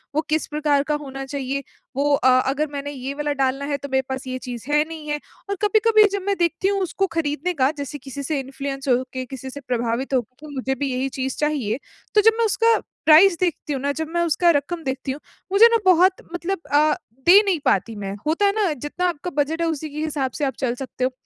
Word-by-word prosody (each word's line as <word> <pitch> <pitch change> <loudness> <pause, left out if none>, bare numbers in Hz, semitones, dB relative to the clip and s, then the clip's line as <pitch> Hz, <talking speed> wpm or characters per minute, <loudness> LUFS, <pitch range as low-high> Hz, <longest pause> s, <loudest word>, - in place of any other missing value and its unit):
वो 310 - +3
किस 310 0 0
प्रकार 295 -2 +1
का 300 - +2
होना 270 -2 -6
चाहिए, 275 0 -3 0.3
वो 285 +1 +2
अ, 260 -2 +3 0.2
अगर 300 +3 0
मैंने 285 0 -4
ये 270 0 -5
वाला 295 0 -2
डालना 270 0 0
है 285 0 -1
तो 280 0 -8
मेरे 265 0 +3
पास 265 0 -4
ये 255 0 -3
चीज़ 245 -2 -7
है 300 0 +4
नहीं 315 -2 -8
है 295 0 -1 0.3
और 400 - 0
कभी-कभी 435 +1 +5
जब 400 - -1
मैं 400 - +2
देखती 340 +2 +1
हूँ 395 -1 +1
उसको 385 +2 0
खरीदने 305 +3 -1
का, 270 -1 +2
जैसे 285 +1 -5
किसी 275 +1 -7
से 295 0 -1
इन्फ्लुएंस 275 +1 -5
हो 255 0 +3
के 255 0 -4
किसी 265 0 -8
से 285 - -8
प्रभावित 240 +2 -1
होके 255 +4 -3
मुझे 265 +1 -1
भी 270 0 -2
यही 260 +2 -1
चीज़ 265 0 -2
चाहिए, 280 -6 -1 0.4
तो 420 - +7
जब 450 +2 +6
मैं 460 - +4
उसका 455 +2 +3 0.3
प्राइस 335 +3 +7
देखती 330 -4 -1
हूँ 265 - -3
ना 285 - 0
जब 315 +2 -3
मैं 345 - +1
उसका 340 +2 +3
रकम 320 +3 -1
देखती 265 -1 -3
हूँ, 275 - -6 0.3
मुझे 430 +4 +8
ना 460 - +5
बहुत 370 +1 +5
मतलब 350 +1 -2
अ, 300 +1 +5 0.3
दे 380 +4 +9
नहीं 365 -5 +1
पाती 215 +3 +1
मैं, 200 -1 -5
होता 335 +6 +2
है 400 - +4
ना 410 -6 +1
जितना 295 +7 -2
आपका 345 +2 -4
बजट 320 +3 -4
है 335 - +1
उसी 315 -1 -3
के 295 - -10
हिसाब 280 -4 -2
से 295 - 0
आप 265 - -1
चल 250 -3 0
सकते 255 -1 -5
हो। 255 - +2
290 Hz, 235 wpm, -22 LUFS, 265-335 Hz, 0.4 s, दे